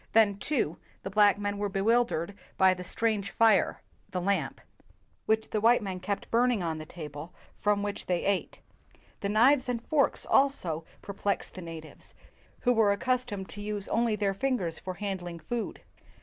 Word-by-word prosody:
Then 205 -2 +4
too 230 - -1 0.2
the 195 - -5
black 205 0 +5
men 205 0 -2
were 205 0 -1
bewildered 200 -2 +1 0.2
by 190 0 +6
the 180 0 -7
strange 210 +1 0
fire 220 -1 +3 0.3
[the 180 - -2
lamp] 200 +3 0 0.7
which 220 0 +1
the 215 - 0
white 235 +1 +5
men 190 -2 -4
kept 195 +2 -4
burning 235 -3 +3
on 160 -2 -2
the 155 - -8
table 150 -1 -8 0.2
from 205 0 +2
which 205 0 -4
they 180 -1 0
ate. 200 -2 -1 0.6
The 200 - -2
knives 255 +5 +4
and 245 -2 0
forks 280 +4 +1
also 180 - +2 0.2
perplexed 200 0 -2
the 185 - -8
natives, 165 -2 -10 0.5
who 245 - +3
were 220 -3 +4
accustomed 210 -2 -1
to 205 - -8
use 205 -1 -4
only 230 -1 +2
their 200 -2 0
fingers 195 -8 -1
for 185 -1 -6
handling 185 -3 -4
food. 225 +9 -4
205 Hz, 165 wpm, -29 LUFS, 185-225 Hz, 0.7 s, by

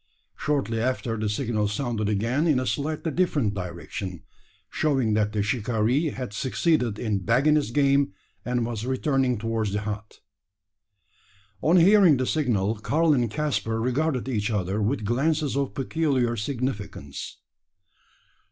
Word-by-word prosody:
Shortly 115 -7 -1
after 120 -1 -1
the 110 -1 -2
signal 110 -2 0
sounded 110 -1 -2
again 115 +10 +1
in 145 -5 +3
a 130 - -2
slightly 155 +4 -2
different 150 - +1
direction 90 0 -6 0.4
showing 135 -8 +1
that 105 -1 +1
the 105 -2 0
shikaree 120 +6 +1
had 125 -6 -6
succeeded 125 -2 0
in 105 -4 -1
bagging 125 +10 +3
his 150 -5 +1
game, 140 -2 +2 0.3
and 125 -1 0
was 115 -2 -4
returning 130 -1 +1
towards 110 -2 -2
the 105 - -1
hut. 105 0 -6 1.4
On 165 +4 +4
hearing 180 -3 +6
the 130 - 0
signal, 115 -8 0
Karl 155 +7 +2
and 120 -4 +1
Caspar 130 -5 -1
regarded 130 +2 0
each 115 -3 -1
other 100 -1 -1
with 110 +1 0
glances 145 +5 0
of 140 -1 -1
peculiar 135 -4 0
significance. 115 -1 -4
120 Hz, 135 wpm, -25 LUFS, 105-140 Hz, 1.4 s, hearing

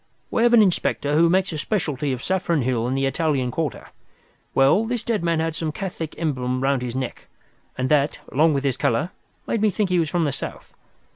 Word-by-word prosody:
"We - - +1
have 240 0 +5
an 220 - +7
inspector 170 -6 0
who 165 +2 +5
makes 185 +2 +2
a 155 - -3
specialty 150 - -1
of 125 -1 -4
Saffron 175 -6 0
Hill 120 -2 0
and 130 +2 -1
the 135 - +1
Italian 135 -3 0
Quarter. 155 -4 -3 0.7
Well, 135 +10 +5
this 240 0 -2
dead 220 -6 -1
man 165 -1 +1
had 165 0 -1
some 160 -1 -3
Catholic 165 -2 -5
emblem 130 -5 -1
round 135 -1 +1
his 125 -1 -4
neck, 130 -2 -4 0.5
and 130 0 0
that, 145 -1 +2
along 155 +2 +3
with 140 - -1
his 135 -3 0
colour, 150 +11 0 0.3
made 230 - -1
me 215 - +4
think 200 0 -1
he 180 -1 +2
was 160 -3 0
from 175 +1 +1
the 145 - +1
South. 135 - -7
155 Hz, 215 wpm, -23 LUFS, 135-180 Hz, 0.7 s, an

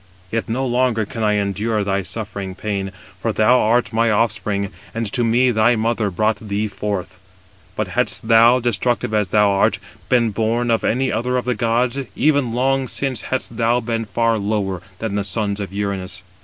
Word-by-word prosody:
Yet 115 0 -2
no 130 +4 -1
longer 120 -3 +1
can 115 - -6
I 105 -1 +2
endure 105 +2 0
thy 100 0 0
suffering 100 -2 -5
pain, 100 -2 -3 0.3
for - - 0
thou 125 +4 +4
art 120 +2 +2
my 115 +1 +2
offspring, 105 -2 0 0.2
and 115 0 -1
to 120 - +1
me 120 +2 +3
thy 115 +1 +3
mother 110 -1 0
brought 110 +3 0
thee 105 0 -2
forth. 100 -3 -4 0.6
But - - -2
hadst - - 0
thou, 115 +2 +6
destructive 120 -1 0
as 105 -2 +2
thou 105 +1 +3
art, 100 - +2 0.3
been 120 -3 +3
born 115 +3 0
of 115 - +1
any 130 +3 +1
other 125 +2 0
of 125 - -2
the 125 - +1
gods, 120 +3 0 0.2
even 145 -5 +2
long 130 +2 +1
since 130 -4 -2
hadst 130 -3 -3
thou 120 +1 +2
been 115 -1 -2
far 115 +1 +1
lower 100 -3 -1 0.2
than 110 -1 -3
the 100 0 0
sons 100 +1 -2
of 100 -2 -5
Uranus." 100 -2 -4
110 Hz, 185 wpm, -20 LUFS, 100-120 Hz, 0.6 s, thou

